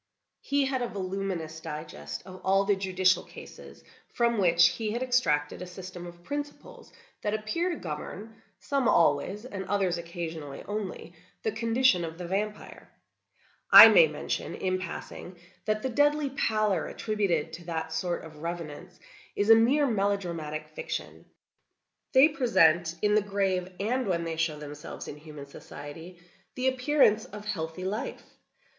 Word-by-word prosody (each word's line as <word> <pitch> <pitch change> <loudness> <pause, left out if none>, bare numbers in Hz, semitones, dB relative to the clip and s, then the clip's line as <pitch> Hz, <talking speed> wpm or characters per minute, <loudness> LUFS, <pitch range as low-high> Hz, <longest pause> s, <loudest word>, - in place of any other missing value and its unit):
He 280 0 +1
had 265 -1 -1
a 245 - 0
voluminous 185 -5 -4
digest 150 - -7
of 185 0 -11
all 195 +1 +3
the 205 0 +3
judicial 185 -1 +2
cases, - - -13 0.3
from 235 -2 +1
which 170 -2 +5
he 220 -2 -3
had 240 +2 -2
extracted 170 -14 +1
a 180 - -6
system 180 -1 -9
of 175 0 -13
principles 290 +6 -7 0.3
that 210 0 -1
appear 275 +12 -1
to 345 - -2
govern—some 220 - -5
always, 195 +5 +2
and 200 -6 -5
others 185 -3 0
occasionally 165 -4 -6
only—the 190 -1 -6
condition 230 -3 +2
of 165 0 -6
the 180 - -6
vampire. 210 +4 -4 0.8
I - - +12
may - - +7
mention, - - -4
in 185 0 -1
passing, 180 0 -8 0.3
that 215 0 -1
the 260 - 0
deadly 290 +2 +2
pallor 215 - 0
attributed 185 -8 -1
to 170 +1 -9
that 160 -1 -4
sort 175 +2 -2
of 155 -1 -12
revenants, 165 -3 -6 0.4
is 205 +2 +3
a - - +11
mere 260 +6 +4
melodramatic 190 - -2
fiction. - - -6 0.9
They 265 +2 +8
present, 170 - +3
in 210 0 +3
the 215 - +4
grave, 195 -2 -1
and 245 +4 0
when 170 -3 0
they 165 -1 -4
show 160 -2 0
themselves 150 0 -8
in 145 - -7
human 150 -2 -10
society, 160 +5 -10 0.4
the 255 0 -1
appearance 255 -4 +3
of 210 0 -10
healthy 185 -3 -4
life. 210 +4 -4
190 Hz, 145 wpm, -28 LUFS, 165-225 Hz, 0.9 s, I